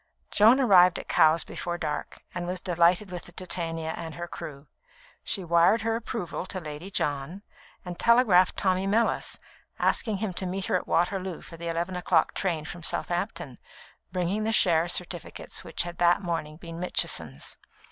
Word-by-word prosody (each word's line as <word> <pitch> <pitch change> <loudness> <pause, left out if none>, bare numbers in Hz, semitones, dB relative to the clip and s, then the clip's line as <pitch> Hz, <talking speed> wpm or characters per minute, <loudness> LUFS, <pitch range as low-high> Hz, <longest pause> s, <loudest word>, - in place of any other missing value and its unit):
Joan 225 +6 +6
arrived 185 -8 +6
at - - -8
Cowes 160 +1 +4
before 175 0 -4
dark, 150 -3 -4
and 175 0 -4
was 180 +1 -2
delighted 180 +2 +2
with 175 -1 -6
the - - -13
Titania 165 -3 -3
and 160 -2 -7
her 175 0 -5
crew. 145 -3 -8 0.6
She 195 - 0
wired 170 +6 +4
her 225 0 0
approval 220 -5 -4
to 185 - -4
Lady 155 +2 -7
John, 150 +2 -2 0.4
and 175 -1 -7
telegraphed 230 -7 +4
Tommy 190 -1 +1
Mellis, 225 +3 +1 0.4
asking 220 -4 +1
him 200 -2 -3
to 185 +1 -4
meet 190 +1 -3
her - - 0
at 180 - -1
Waterloo 185 +1 0
for 165 - -11
the 170 +1 -7
eleven 170 +2 -2
o'clock 175 -2 +2
train 165 -6 -2
from 175 +1 -7
Southampton, 175 - -2 0.5
bringing 185 +3 -1
the 220 - 0
share 170 -6 +4
certificates 175 0 -2
which - - -2
had 175 0 -8
that 175 +2 +4
morning 160 -3 -3
been 165 0 -9
Mitchison's. 80 - -1
175 Hz, 165 wpm, -27 LUFS, 165-190 Hz, 0.6 s, Joan